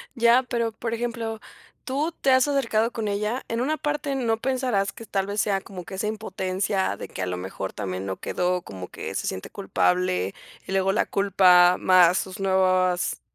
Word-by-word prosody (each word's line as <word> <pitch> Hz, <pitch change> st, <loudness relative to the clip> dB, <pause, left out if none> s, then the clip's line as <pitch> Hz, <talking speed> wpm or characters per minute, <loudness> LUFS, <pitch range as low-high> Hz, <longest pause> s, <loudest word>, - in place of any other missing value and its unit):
Ya, 235 Hz, +1 st, +5 dB
pero, 235 Hz, -3 st, -2 dB
por 225 Hz, +1 st, -4 dB
ejemplo, 230 Hz, -1 st, -3 dB, 0.4 s
¿tú 295 Hz, +4 st, -1 dB
te 275 Hz, -, 0 dB
has 260 Hz, +2 st, +4 dB
acercado 235 Hz, -5 st, +1 dB
con 225 Hz, -3 st, -3 dB
ella?, 210 Hz, +5 st, -2 dB
en 230 Hz, +1 st, -2 dB
una 300 Hz, +5 st, 0 dB
parte, 295 Hz, -1 st, -2 dB
¿no 230 Hz, -4 st, +1 dB
pensarás 250 Hz, -7 st, 0 dB
que 230 Hz, -, -11 dB
tal 195 Hz, -2 st, -1 dB
vez 205 Hz, +1 st, -2 dB
sea 195 Hz, -1 st, +1 dB
como 185 Hz, -2 st, -9 dB
que 190 Hz, -, -9 dB
esa 190 Hz, +3 st, -2 dB
impotencia 190 Hz, -, -2 dB
de -, -, -8 dB
que -, -, -6 dB
a -, -, -1 dB
lo 90 Hz, 0 st, -2 dB
mejor 95 Hz, +1 st, -5 dB
también 95 Hz, -2 st, -4 dB
no 95 Hz, -1 st, -3 dB
quedó?, 180 Hz, 0 st, -1 dB
como 95 Hz, -, -8 dB
que -, -, -7 dB
se -, -, -2 dB
siente 95 Hz, -, -4 dB
culpable 180 Hz, -, 0 dB, 0.3 s
y -, -, -5 dB
luego 195 Hz, 0 st, +2 dB
la 210 Hz, -, +1 dB
culpa 180 Hz, -2 st, +5 dB
más 180 Hz, -1 st, +5 dB
sus 190 Hz, +1 st, -5 dB
nuevas 185 Hz, -2 st, +2 dB
200 Hz, 195 wpm, -25 LUFS, 180-235 Hz, 0.4 s, Ya